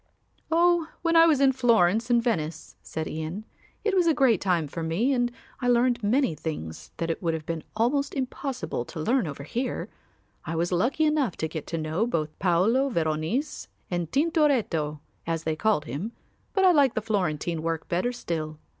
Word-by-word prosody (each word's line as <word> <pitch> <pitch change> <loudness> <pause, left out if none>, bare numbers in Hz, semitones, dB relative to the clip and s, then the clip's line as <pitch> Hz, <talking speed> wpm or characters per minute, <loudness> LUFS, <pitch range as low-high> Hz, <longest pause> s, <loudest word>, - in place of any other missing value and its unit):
"Oh, 340 0 +3 0.2
when 335 -1 +2
I 330 0 +8
was 305 -4 +4
in 275 -1 +5
Florence 230 -3 +3
and 240 -1 +3
Venice," 165 -9 -2
said 160 0 -5
Ian; 160 +7 -5 0.4
"it 425 - +1
was 360 -2 +3
a 325 - +4
great 245 -8 +3
time 175 -5 +1
for 165 +4 -6
me 180 +12 +1
and 245 -1 +1 0.3
I 245 - -1
learned 245 0 +3
many 230 - +2
things 145 - -6
that 165 -1 -1
it - - -4
would 165 -3 0
have 155 -1 -6
been 165 -2 -4
almost 275 +6 +1
impossible 265 - -3
to 160 - -8
learn 235 +5 +1
over 140 -1 -6
here. 245 - -3 0.5
I 165 - -4
was 170 +2 0
lucky 245 - +2
enough 300 - +1
to 160 - -1
get 160 -1 -6
to 165 - -3
know 160 +8 -1
both 155 -8 -2
Paolo 205 +10 +3
Veronese 165 - -1 0.2
and 175 -2 -2
Tintoretto 270 - +1 0.3
as 165 -1 -1
they 160 -1 -1
called 205 -3 +1
him, 160 - -5 0.4
but 385 -2 +3
I 370 - +8
like 285 -6 +4
the 220 - 0
Florentine 175 -6 -1
work 165 0 -2
better 180 +8 0
still. 160 -10 -4
210 Hz, 185 wpm, -26 LUFS, 160-265 Hz, 0.5 s, I